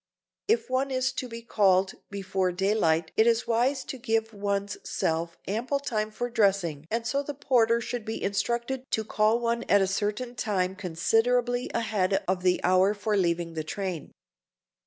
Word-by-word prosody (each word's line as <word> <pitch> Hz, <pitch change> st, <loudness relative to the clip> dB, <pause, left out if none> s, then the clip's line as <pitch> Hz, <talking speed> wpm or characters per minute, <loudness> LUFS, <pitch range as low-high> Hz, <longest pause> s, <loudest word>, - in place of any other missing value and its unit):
If 450 Hz, +3 st, +2 dB
one 260 Hz, +1 st, 0 dB
is 260 Hz, 0 st, 0 dB
to 255 Hz, -1 st, -4 dB
be 230 Hz, -1 st, -8 dB
called 190 Hz, -4 st, +3 dB, 0.2 s
before 190 Hz, -2 st, -1 dB
daylight 175 Hz, -4 st, +1 dB
it 220 Hz, -, +5 dB
is 230 Hz, 0 st, +3 dB
wise 255 Hz, +4 st, +1 dB
to 265 Hz, -, -7 dB
give 225 Hz, -2 st, 0 dB
one's 200 Hz, 0 st, -2 dB
self 165 Hz, +1 st, -2 dB
ample 240 Hz, +8 st, -1 dB
time 215 Hz, -6 st, -2 dB
for 245 Hz, +3 st, -3 dB
dressing 195 Hz, -10 st, +1 dB
and 230 Hz, +1 st, -2 dB
so 275 Hz, +4 st, 0 dB
the 285 Hz, 0 st, -6 dB
porter 235 Hz, -4 st, +3 dB
should 240 Hz, 0 st, -4 dB
be 220 Hz, 0 st, -4 dB
instructed 235 Hz, +6 st, -1 dB
to 220 Hz, -, 0 dB
call 215 Hz, +2 st, +2 dB
one 235 Hz, 0 st, 0 dB
at 200 Hz, -, +6 dB
a 195 Hz, -, +3 dB
certain 210 Hz, +5 st, -2 dB
time 190 Hz, -5 st, -1 dB
considerably 235 Hz, +7 st, +1 dB
ahead 210 Hz, -4 st, 0 dB
of 185 Hz, 0 st, 0 dB
the 180 Hz, 0 st, +2 dB
hour 185 Hz, +3 st, +4 dB
for 210 Hz, +1 st, -1 dB
leaving 170 Hz, -3 st, 0 dB
the 160 Hz, -1 st, -3 dB
train. 185 Hz, 0 st, -4 dB
215 Hz, 170 wpm, -27 LUFS, 190-240 Hz, 0.2 s, at